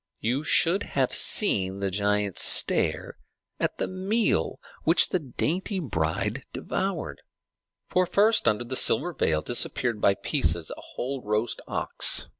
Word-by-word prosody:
You 125 +6 -2
should 175 +5 +4 0.2
have 130 -2 +1
seen 95 0 +5
the 100 -1 -2
giants 105 0 +1
stare - - +3 0.4
at - - -2
the - - -3
meal 190 - -1 0.2
which 165 +2 +3
the 185 - -1
dainty 170 - -3
bride 105 - -3
devoured! 165 - -5 0.7
For 185 0 0
first 215 +4 +2
under 105 +3 +1
the 125 +2 -5
silver 175 +6 +2
veil 80 - -1
disappeared 120 -2 0
by 100 - +2
pieces 80 -2 -3
a - - -13
whole 135 +1 -5
roast 105 +2 -3
ox. - - -3
120 Hz, 135 wpm, -25 LUFS, -, 0.7 s, seen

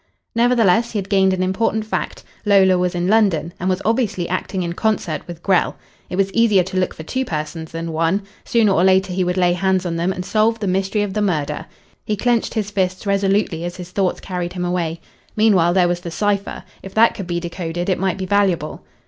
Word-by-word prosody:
Nevertheless 230 -2 +3
he - - -1
had 195 -1 -4
gained 190 -1 +4
an 185 0 0
important 215 +3 0
fact. 215 - -4 0.2
Lola 195 -3 +5
was 180 0 0
in 175 0 -1
London 190 -7 +2
and 185 - -1
was 185 0 -1
obviously 220 -6 0
acting 185 +1 -2
in 170 0 -3
concert 190 -6 -1
with 170 -1 -9
Grell. 190 -2 +2 0.3
It - - -4
was 195 0 0
easier 215 -5 +4
to 185 +1 -5
look 185 - -1
for 160 - -8
two 260 +11 -2
persons 160 -4 -5
than 165 0 -4
one. 165 +5 0 0.2
Sooner 225 -4 +2
or 180 -2 +3
later 190 0 +3
he 185 0 +1
would 180 +1 -1
lay 180 -1 +3
hands 190 0 +1
on 165 -1 -2
them 170 +3 0
and 180 -1 -5
solve 220 +3 +2
the 210 - -3
mystery 195 +2 0
of 200 -2 -3
the 210 - -1
murder. 150 -7 -1 0.4
He 215 - -1
clenched 240 +2 0
his 210 -2 -2
fists 185 -1 -1
resolutely 195 -3 +1
as 175 0 -4
his 180 -1 -9
thoughts 190 -1 0
carried 180 -2 -4
him 180 -1 -3
away. 170 -2 -2 0.3
Meanwhile 190 -6 +3
there 180 -2 +4
was 175 0 -1
the 175 - -7
cipher. 200 +3 -1 0.2
If 195 - -10
that 230 +1 +5
could 195 - -7
be 175 -1 -1
de 170 0 -6
coded 175 0 -4
it 185 - +1
might 190 -1 0
be 190 - -3
valuable. 185 -5 0
185 Hz, 225 wpm, -20 LUFS, 175-205 Hz, 0.4 s, Lola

